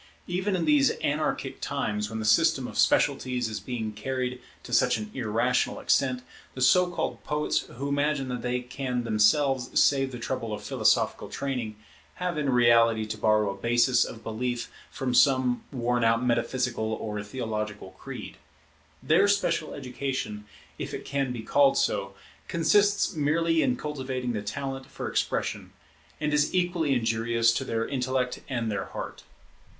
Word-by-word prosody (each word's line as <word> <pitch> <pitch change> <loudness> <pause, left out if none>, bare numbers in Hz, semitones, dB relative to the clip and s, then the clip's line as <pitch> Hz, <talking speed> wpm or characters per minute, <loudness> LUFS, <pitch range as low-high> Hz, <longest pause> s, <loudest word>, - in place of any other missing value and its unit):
Even 185 +3 -1
in 180 - 0
these 290 -3 +5
anarchic 150 +2 -1
times, 105 -1 -2
when 110 - -5
the 110 - -3
system 105 0 +3
of - - -9
specialities 125 -2 +2
is 110 -2 -4
being 110 +1 -4
carried 125 +3 -3 0.2
to - - -8
such - - +4
an 105 -1 -6
irrational 125 0 0
extent, 130 -2 +1 0.3
the 130 - -5
so 180 +9 +5
called 170 -2 -3
poets 150 0 0 0.2
who 140 +3 -3
imagine 145 -1 0
that 125 -1 -3
they 125 0 -1
can 125 0 -3
themselves 125 +4 +2
save 135 -2 +3
the 125 - -6
trouble 120 -2 -3
of 105 - -6
philosophical - - +1
training, 125 -6 -3 0.4
have 180 -1 -2
in 150 -2 -1
reality 115 -3 +4
to 110 0 -4
borrow 110 -1 +2
a - - -7
basis 120 +1 +3
of 115 - -8
belief 120 +2 -3 0.2
from 130 -2 -3
some 130 -2 +3
worn 120 -2 0
out 115 +2 +3
metaphysical 120 -2 0
or 105 -1 -4
theological 105 -3 -4
creed. - - -9 0.7
Their 170 +6 +4
special 185 -6 0
education, 130 -5 -4 0.3
if - - -4
it - - -8
can 140 -2 -1
be 120 -3 -5
called 140 +3 +4
so, 100 -1 0 0.3
consists 200 +5 +3
merely 160 +2 +2
in 255 - +2
cultivating 130 - -3
the 105 - -2
talent 135 +5 -5
for - - -6
expression, - - -2 0.5
and 150 0 -1
is 150 +4 +2
equally 175 -5 +1
injurious 115 0 +2
to - - -1
their 115 0 -2
intellect 130 -1 -1
and 115 -4 -1
their 100 -2 -2
heart. - - -7
125 Hz, 155 wpm, -27 LUFS, 115-140 Hz, 0.7 s, these